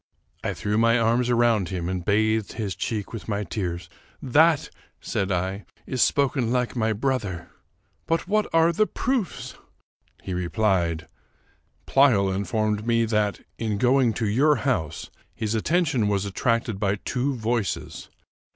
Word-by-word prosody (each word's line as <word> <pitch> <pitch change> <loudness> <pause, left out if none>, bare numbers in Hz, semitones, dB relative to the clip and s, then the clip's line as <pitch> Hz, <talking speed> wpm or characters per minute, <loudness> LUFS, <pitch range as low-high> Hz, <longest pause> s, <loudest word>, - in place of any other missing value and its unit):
I - - -2
threw 105 +1 -1
my 115 +1 +4
arms 115 +2 +2
around 115 -6 +2
him 90 -2 -3
and 90 -1 -3
bathed 110 +1 +1
his 105 -4 -3
cheek 105 -2 -4
with 115 - -7
my 105 -1 -1
tears. 90 -3 -4 0.2
" - - -32 0.2
That," 160 -2 +4 0.3
said 100 0 -2
I, 95 +3 -2
" - - -34
is 130 -2 -2
spoken 135 -4 +2
like 125 0 0
my 110 -2 +1
brother. 105 -7 -2 0.6
But 165 +1 0
what 215 +2 +1
are 165 +1 +4
the 215 +5 +2
proofs?" 250 -8 -2 0.7
He 95 - -4
replied, 90 -3 0 0.4
" - - -39
Pleyel 115 -9 +4
informed 105 +3 -1
me 115 -1 +3
that, 105 -2 0 0.2
in 110 -3 -1
going 125 +1 +3
to 110 +2 -2
your 140 +9 +3
house, 80 - -2 0.2
his 110 -2 -2
attention 135 -1 +1
was 100 -1 0
attracted 115 +1 -1
by 100 -1 +1
two 130 +7 -2
voices. 115 -2 -3
110 Hz, 150 wpm, -25 LUFS, 100-125 Hz, 0.7 s, my